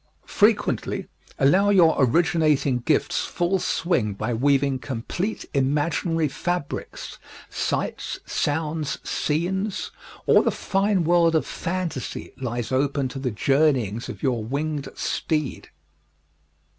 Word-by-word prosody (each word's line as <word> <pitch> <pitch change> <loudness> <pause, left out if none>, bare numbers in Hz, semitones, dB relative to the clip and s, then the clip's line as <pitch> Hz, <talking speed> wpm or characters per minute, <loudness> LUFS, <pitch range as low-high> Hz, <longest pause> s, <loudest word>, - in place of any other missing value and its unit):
Frequently, - - +1 0.3
allow 185 +9 +4
your 175 -5 +6
originating 150 -1 +3
gifts 145 +5 +1
full 175 +2 0
swing 125 - 0
by 110 +4 -2
weaving 135 +2 +2
complete 145 - -4
imaginary 150 +4 +1
fabrics 175 +1 -4 0.3
sights, - - -2
sounds, 150 0 -1
scenes; 190 +6 -1 0.3
all - - +6
the - - +1
fine 195 -1 +1
world 170 0 +4
of 160 - +2
fantasy 170 -7 -4
lies 120 -2 -3
open 140 0 +1
to 135 - -6
the 130 -1 -1
journeyings 125 -2 +1
of - - -8
your 125 -5 +1
winged 145 +4 -3
steed. 155 -4 -2
150 Hz, 105 wpm, -24 LUFS, 130-170 Hz, 0.3 s, your